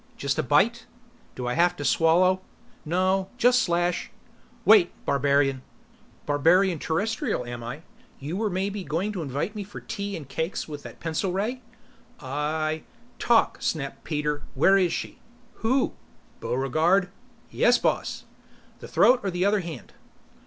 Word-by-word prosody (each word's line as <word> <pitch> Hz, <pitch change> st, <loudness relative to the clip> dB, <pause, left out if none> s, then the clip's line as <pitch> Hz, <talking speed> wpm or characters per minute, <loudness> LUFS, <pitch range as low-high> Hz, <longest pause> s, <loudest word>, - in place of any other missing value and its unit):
"Just 140 Hz, -1 st, -1 dB
a -, -, +4 dB
bite?" 220 Hz, -, +2 dB, 0.5 s
"Do 125 Hz, -, -5 dB
I 125 Hz, -, -1 dB
have 175 Hz, +3 st, +3 dB
to 145 Hz, -, -5 dB
swallow?" 175 Hz, +7 st, +3 dB, 0.4 s
"No. 185 Hz, +3 st, +1 dB
Just 250 Hz, 0 st, +4 dB
slash 175 Hz, 0 st, 0 dB, 0.3 s
" -, -, -30 dB
"Wait, 205 Hz, -5 st, +7 dB, 0.2 s
barbarian 140 Hz, -1 st, +2 dB, 0.3 s
" -, -, -31 dB
"Barbarian 165 Hz, +5 st, +3 dB
Terrestrial, 185 Hz, -, -1 dB
am 120 Hz, -1 st, -6 dB
I? 125 Hz, +7 st, -7 dB, 0.4 s
You 145 Hz, +5 st, -5 dB
were 215 Hz, +2 st, 0 dB
maybe 195 Hz, +2 st, -2 dB
going 180 Hz, +6 st, -2 dB
to 190 Hz, -4 st, -4 dB
invite 145 Hz, +7 st, -3 dB
me 210 Hz, -, -4 dB
for 205 Hz, +1 st, -10 dB
tea 200 Hz, 0 st, -5 dB
and 150 Hz, -5 st, -9 dB
cakes 160 Hz, +6 st, -3 dB
with 150 Hz, -2 st, -7 dB
that -, -, -11 dB
pencil 165 Hz, +3 st, -2 dB
ray?" 220 Hz, +7 st, -2 dB, 0.6 s
"I 155 Hz, +3 st, -2 dB, 0.2 s
" 240 Hz, -, -29 dB
"Talk!" 235 Hz, -1 st, +3 dB
snapped 140 Hz, -4 st, -3 dB
Peter. 150 Hz, -1 st, -2 dB
"Where 190 Hz, +8 st, +5 dB
is 185 Hz, -3 st, +3 dB
she?" -, -, -5 dB, 0.4 s
"Who?" 255 Hz, +4 st, +1 dB, 0.5 s
"Buregarde 160 Hz, +9 st, +1 dB, 0.3 s
?" 235 Hz, -, -31 dB
"Yes, 245 Hz, 0 st, +4 dB
boss. -, -, -1 dB, 0.6 s
The -, -, -9 dB
throat 250 Hz, 0 st, +5 dB
or 200 Hz, -, -2 dB
the 180 Hz, +1 st, 0 dB
other 205 Hz, +1 st, +3 dB
hand?" 165 Hz, -8 st, -8 dB
175 Hz, 155 wpm, -26 LUFS, 145-200 Hz, 0.6 s, Wait